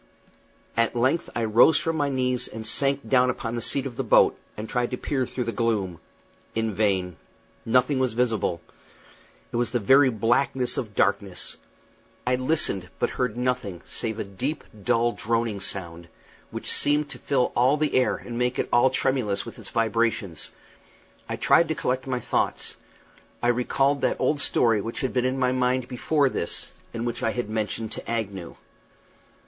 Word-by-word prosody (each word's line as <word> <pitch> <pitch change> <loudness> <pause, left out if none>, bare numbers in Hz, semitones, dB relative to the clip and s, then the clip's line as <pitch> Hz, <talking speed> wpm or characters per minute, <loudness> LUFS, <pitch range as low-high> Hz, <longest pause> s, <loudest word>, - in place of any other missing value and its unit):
At 115 +1 +2
length 130 +8 +1
I 120 - 0
rose 115 +8 +6
from 165 0 -1
my 145 -2 +1
knees 125 -2 0
and 110 0 -7
sank 140 +4 +1
down 125 -1 +4
upon 120 -2 -3
the 120 - -2
seat 135 +4 0
of 125 -3 -6
the - - -1
boat, - - +5 0.2
and 110 +1 -5
tried 125 +1 0
to 125 - -3
peer 130 -2 -1
through 125 - -3
the 115 - -2
gloom. 105 -8 -1 0.6
In 110 -1 0
vain. 95 -4 0 0.5
Nothing 125 +4 +3
was 130 -3 +1
visible. 110 -8 0 0.9
It - - -2
was 120 0 +1
the 125 - 0
very 135 +5 +5
blackness 120 +3 +1
of 105 -5 -6
darkness. - - 0 0.7
I 125 +1 +2
listened, 130 - 0
but - - 0
heard 125 -3 -2
nothing 125 -8 -2
save 110 -2 -2
a - - -2
deep, 130 +10 -4 0.2
dull, 120 0 +2
droning 115 -2 -1
sound, 85 -4 -5 0.4
which - - -3
seemed 145 +1 +2
to - - -8
fill 135 -3 +1
all 130 +5 +4
the 150 0 0
air 130 - +3
and 120 0 -6
make 125 0 0
it - - -1
all 120 +2 +6
tremulous 130 -6 0
with - - -9
its - - -10
vibrations. 115 -6 0 0.8
I - - -1
tried 170 - +4
to 160 - -1
collect 130 -1 -1
my 125 -1 -1
thoughts. - - -1 0.7
I 120 - +3
recalled 135 +3 +1
that - - +1
old 145 -1 +1
theory 115 -6 +3
which 115 +3 -5
had 130 - -1
been 125 -1 +1
in 130 +1 0
my 125 -1 +2
mind 130 0 +1
before 140 +3 +1
this, 85 - -3 0.2
and 115 +1 -4
which 120 - -3
I - - +1
had 120 -3 -3
mentioned 110 0 -2
to - - -6
Agnew. 100 -6 -3
120 Hz, 175 wpm, -25 LUFS, 110-130 Hz, 0.9 s, rose